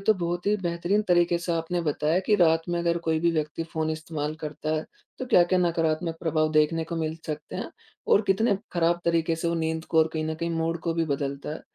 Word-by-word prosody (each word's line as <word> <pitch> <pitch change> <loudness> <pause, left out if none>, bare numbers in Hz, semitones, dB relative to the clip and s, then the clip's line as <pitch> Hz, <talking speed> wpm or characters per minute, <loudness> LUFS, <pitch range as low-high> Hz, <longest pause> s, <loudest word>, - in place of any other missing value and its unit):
तो 220 - +6
बहुत 175 0 -3
ही 210 - +3
बेहतरीन 175 +2 0
तरीके 175 -1 +3
से 170 0 -2
आपने 165 +1 -1
बताया 155 +2 +1
कि 210 - +4
रात 165 -2 +4
में 175 0 0
अगर 170 0 +1
कोई 160 -1 +2
भी 170 - +3
व्यक्ति 155 +1 -2
फ़ोन 160 0 -1
इस्तेमाल 155 -1 -4
करता 155 0 -3
है 155 - -2 0.3
तो 255 - -4
क्या-क्या 185 -6 +4
नकारात्मक 165 -1 0
प्रभाव 155 -1 +1
देखने 155 +1 +2
को 165 +1 -5
मिल 160 0 -2
सकते 155 -1 -5
हैं - - -5 0.4
और 205 - +4
कितने 200 +2 +3 0.2
ख़राब 170 0 +2
तरीके 165 -1 +1
से 165 +1 -1
वो 170 - 0
नींद 160 -1 -2
को 160 - 0
और 160 0 +5
कहीं 155 -1 -2
न 160 0 -2
कहीं 170 +1 -3
मूड 165 0 -1
को 165 -1 -2
भी 165 0 +1
बदलता 140 -1 -3
है। - - -8
165 Hz, 230 wpm, -26 LUFS, 155-175 Hz, 0.4 s, तो